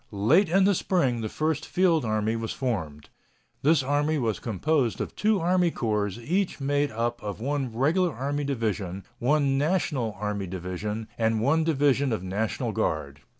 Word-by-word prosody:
Late 140 - +3
in 190 +3 +4
the 200 +1 +4
spring 135 -11 +1
the 110 - -3
first 155 +2 -1
field 175 -7 +2
army 110 0 0
was 115 -1 -3
formed. 85 - -3 0.5
This 150 -1 +4
army 145 +3 +1
was 115 -6 -1
composed 120 - 0
of - - -4
two 215 -1 +2
army 180 +1 +2
corps 105 -8 -1
each 175 +12 -1
made 145 +1 +1
up 120 +2 -2
of 105 -1 -5
one 135 0 -2
Regular 160 +10 +2
Army 140 +4 -2
division, 105 -8 -2 0.2
one 140 +1 +2
National 145 - 0
Army 105 -2 -2
division, 95 +5 -4
and 110 -1 +2
one 145 +8 +2
division 140 -3 +2
of 110 -5 -2
National 100 +2 -2
Guard. 70 -2 -2
130 Hz, 160 wpm, -26 LUFS, 110-155 Hz, 0.5 s, in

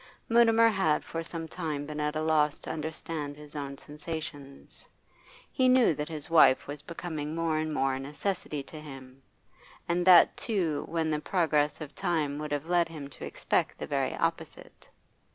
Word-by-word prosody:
Mutimer 230 -1 +5
had 190 -8 +1
for 165 - -4
some 165 0 -5
time 155 -4 -4
been 150 0 -6
at 150 0 -1
a 155 - -1
loss 155 -2 +2
to - - -5
understand 155 -1 -5
his 150 0 -12
own 140 -1 -5
sensations; 150 -2 -8 0.6
he 260 -2 +3
knew 255 -8 +5
that 150 +1 -4
his 155 -3 -6
wife 165 -6 +5
was 145 +1 -7
becoming 160 -3 -5
more 165 -2 0
and 155 0 -2
more 135 -3 +1
a 130 - -3
necessity 150 +1 -3
to 155 +2 -10
him, 135 -3 -11 0.7
and 175 +1 +1
that 175 -2 +8
too 175 -10 -1
when 160 -1 0
the 150 - 0
progress 150 -3 +1
of 150 -1 -7
time 155 -4 -1
would 150 -1 -5
have 145 0 -2
led 175 -1 +2
him 150 -4 -8
to - - -9
expect - - -1
the - - -5
very - - -1
opposite. - - -4
155 Hz, 175 wpm, -29 LUFS, 145-165 Hz, 0.7 s, that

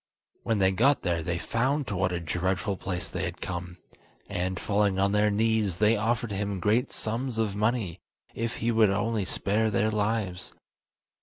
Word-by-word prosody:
When 115 - 0
they 95 -1 +4
got 125 +9 +3
there 85 -3 0
they 85 +2 -2
found 130 - 0
to 105 - -4
what 90 0 +1
a 90 - -1
dreadful 90 +4 -1
place 90 -1 -4
they - - -4
had - - -4
come, 90 0 -5 0.5
and, 90 +1 -2
falling 100 -2 +1
on 100 +1 +2
their 105 +1 +3
knees, 110 -3 +1
they 105 +3 +4
offered 115 +1 0
him 100 -1 -2
great 110 +6 +1
sums 115 +2 -2
of 110 -3 0
money, 105 -5 -1 0.3
if 115 0 -2
he 115 - 0
would 110 -2 +5
only 105 +1 0
spare 105 +4 0
their 110 +1 +1
lives. 105 -4 -1
105 Hz, 175 wpm, -28 LUFS, 95-110 Hz, 0.5 s, would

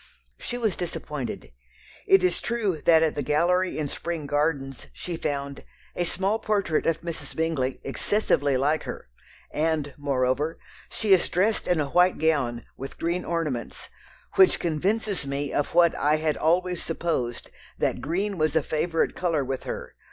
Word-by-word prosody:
She 245 - -4
was 220 -6 0
disappointed. 150 - -5 0.6
It 195 -1 +6
is 180 -1 +2
true 210 -9 -1
that 160 -1 +6
at 160 - +2
the 145 - -2
Gallery 175 +6 +2
in 155 -2 -1
Spring 165 +1 -4
Gardens 145 -3 -1
she 175 - -5
found 140 -2 -3 0.3
"a 175 - 0
small 195 +5 0
portrait 200 -8 0
of 165 -1 +1
Mrs. 170 -1 -6
Bingley, 155 -6 -1
excessively 145 -3 +1
like 150 +4 +1
her," - - -7 0.4
and, 155 -2 0
moreover, 140 +2 0 0.3
"she 210 -3 +2
is 180 - +3
dressed 205 +5 +1
in 175 -3 +2
a 140 -2 -1
white 180 +1 +4
gown, 140 -7 +1
with 135 +1 -8
green 170 +2 -1
ornaments, 155 -8 -3 0.5
which 380 -1 +6
convinces 185 +1 -1
me 140 +1 -2
of 145 - -1
what 170 -1 +6
I 150 +1 +2
had 155 -1 0
always 180 +3 +1
supposed, 160 -8 -2 0.3
that - - 0
green 190 +4 -1
was 155 0 +1
a 160 - +3
favourite 165 +3 0
colour 165 -6 0
with 130 0 -4
her. - - -5
160 Hz, 160 wpm, -26 LUFS, 145-180 Hz, 0.6 s, It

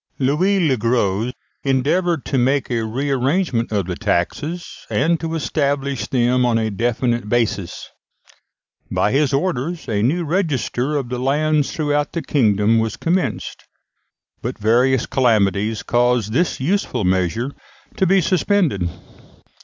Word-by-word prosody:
Louis 165 +9 +2
le 130 -3 +2
Gros 115 -1 0 0.3
endeavoured 145 +5 +1
to 135 - 0
make 135 +2 +1
a 115 -2 0
re 130 +6 -2
arrangement 135 -2 0
of 100 -4 0
the 90 0 -4
taxes, 150 - -3
and 165 +3 +1
to 165 0 -3
establish 140 -3 -1
them 125 0 +2
on 120 -2 +2
a 110 -1 -1
definite 120 +1 -1
basis. 110 -6 -1 1.0
By 105 - +1
his 140 +1 +2
orders 165 +2 -2
a 105 -2 0
new 155 +10 +1
register 150 - -1
of 135 -4 -3
the 125 -1 -3
lands 150 +3 +1
throughout 145 -2 -1
the 170 - -3
kingdom 110 -4 +2
was 110 0 -2
commenced, 175 +2 -2 0.8
but 125 +2 -4
various 120 +4 +2
calamities 105 -3 +1
caused 120 -3 +1
this 175 +7 +1
useful 175 - 0
measure 95 - 0 0.5
to 190 - +2
be 190 +1 +4
suspended. 175 - +1
130 Hz, 135 wpm, -20 LUFS, 115-150 Hz, 1.0 s, be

